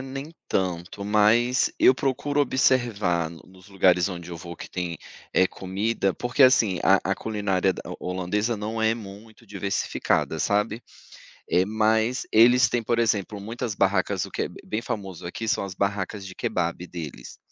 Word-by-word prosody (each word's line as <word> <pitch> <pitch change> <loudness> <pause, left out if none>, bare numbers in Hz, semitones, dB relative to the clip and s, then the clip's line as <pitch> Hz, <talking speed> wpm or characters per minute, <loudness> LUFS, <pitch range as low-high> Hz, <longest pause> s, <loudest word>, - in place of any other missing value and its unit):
nem 135 +4 -7 0.2
tanto, 90 +1 -2
mas 110 +4 +3
eu 130 - +6
procuro 140 +2 -1
observar 115 - +2
no 80 0 -12 0.2
nos 95 - -18
lugares 90 -2 +3
onde 85 -2 -7
eu 85 - -6
vou 85 +1 -9
que - - -9
tem, 90 -2 -3 0.4
eh, 95 - +5
comida 95 +2 -2
porque 125 +3 +1
assim, 110 -8 +5
a 95 +1 +6
a 95 - 0
culinária 100 -4 0
da - - -8
ho - - -6
holandesa 105 +5 -1
não 110 +2 -4
é 110 0 +3
muito 110 +1 -12
diversificada, 100 -1 -1
sabe, 105 +3 0 0.7
eh, 90 - +3
mas 110 +4 +1
eles 120 +3 +6
têm, 120 0 0
por 115 +1 0
exemplo, 105 -2 0
muitas 110 +1 -4
barracas 95 -1 +1
o - - -12
que - - -2
é - - -4 0.2
bem 110 +2 -2
famoso 95 -7 -5
aqui 110 +5 -5
são 110 - +1
as 95 -1 -6
barracas 100 0 -2
de 95 - -8
kebap 85 -1 -1
deles, 75 -8 -8
105 Hz, 170 wpm, -25 LUFS, 95-115 Hz, 0.7 s, eu